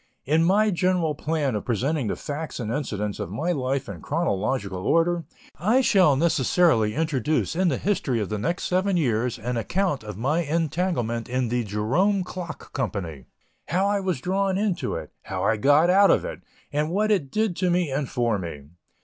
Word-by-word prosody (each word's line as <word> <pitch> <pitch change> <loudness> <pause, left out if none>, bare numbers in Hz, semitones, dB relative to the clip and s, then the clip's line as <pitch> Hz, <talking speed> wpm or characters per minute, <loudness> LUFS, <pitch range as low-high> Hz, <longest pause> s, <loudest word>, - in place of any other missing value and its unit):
In 155 +4 +3
my 205 +5 +3
general 180 -3 +1
plan 150 -2 -1
of 105 - -2
presenting 130 +3 -1
the - - -1
facts 150 0 -5
and 110 -2 -3
incidents 105 -8 -3
of - - -4
my 155 - -1
life 135 -2 -1
in - - -7
chronological 105 - -1
order, 165 0 +2 0.3
I 220 +10 +3
shall 185 - +4
necessarily 150 -6 +2
introduce 155 -1 0
in 185 +1 +2
the 140 -7 +1
history 145 - 0
of 105 - -2
the 105 -1 -2
next 170 - -2
seven 185 +1 +1
years, 125 -5 0
an 120 +2 -3
account 170 - -1
of 105 -3 -7
my 145 +9 +1
entanglement 155 -7 -1
in 125 -1 0
the 120 0 0
"Jerome 130 - +1
Clock 180 -3 -8
Company," 90 - -4 0.4
how 185 +3 +1
I 200 0 +1
was 185 -7 -1
drawn 190 +2 0
into 200 -4 -1
it, - - -6
how - - -3
I 110 - +2
got 145 +9 +4
out 195 +1 +6
of - - +3
it, - - -6 0.3
and 150 +2 0
what 210 +5 +1
it 170 -10 +1
did 215 +1 0
to 185 0 +1
me 175 -4 +1
and 140 0 -2
for 120 -4 0
me. 75 -5 -7
150 Hz, 185 wpm, -25 LUFS, 120-180 Hz, 0.4 s, out